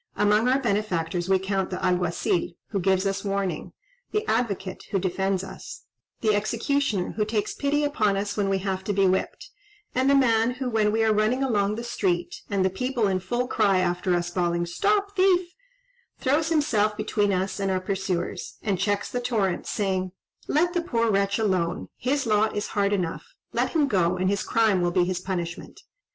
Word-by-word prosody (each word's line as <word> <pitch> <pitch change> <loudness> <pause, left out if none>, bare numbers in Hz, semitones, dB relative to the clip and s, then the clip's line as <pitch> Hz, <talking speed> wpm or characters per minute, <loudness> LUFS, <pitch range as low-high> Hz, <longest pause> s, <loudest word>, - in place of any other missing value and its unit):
Among 210 +3 +3
our 260 +1 +4
benefactors 185 -7 -1
we 190 - +5
count 190 0 -1
the 185 - -3
Alguazil, 180 -1 0 0.2
who 200 - -1
gives 190 +1 +2
us 195 0 -1
warning; 195 -2 -2 0.4
the 425 0 -1
Advocate, 200 -5 -1
who 195 - 0
defends 190 +1 -1
us; 195 - -9 0.4
the 215 -2 +3
Executioner, 220 0 0
who 215 - -1
takes 210 -1 -1
pity 290 +1 0
upon 215 -9 +1
us 200 +1 -2
when 200 -2 0
we 195 - +2
have 190 -1 -3
to 205 - 0
be 195 0 +3
whipped, 190 0 -1 0.4
and 260 +2 +2
the 280 - +5
man 235 -2 +3
who, 255 -1 -3
when 215 -2 +2
we 225 +1 +1
are 220 -1 +3
running 215 +5 +1
along 210 -5 +1
the 235 - -5
street, 180 -7 -1
and 195 -2 +1
the 190 - +2
people 250 +2 0
in 190 -1 +1
full 240 +6 -2
cry 195 -6 +2
after 180 0 +1
us 175 0 -2
bawling 175 -1 0
'Stop 405 - 0
thief,' 370 -2 +3 0.6
throws 300 +4 +1
himself 215 -10 +2
between 210 -1 0
us 190 +1 -1
and 195 -1 0
our 190 -1 +1
pursuers, 185 -2 -3
and 200 -4 0
checks 205 +1 0
the 245 - -2
torrent, 205 -7 -1
saying, 190 -3 -1 0.3
'Let 345 +4 +2
the 350 - +1
poor 230 -9 0
wretch 200 0 +1
alone, 185 -6 0
his 275 +2 -1
lot 215 -1 +2
is 205 - -2
hard 200 -1 +1
enough; 205 - -3 0.2
let - - 0
him 305 -4 +3
go, 185 -6 +1
and 185 +1 +1
his 200 - 0
crime 220 -5 +2
will 175 - +2
be 175 +1 +2
his 180 0 -2
punishment.' 175 -2 -5
200 Hz, 190 wpm, -25 LUFS, 185-235 Hz, 0.6 s, we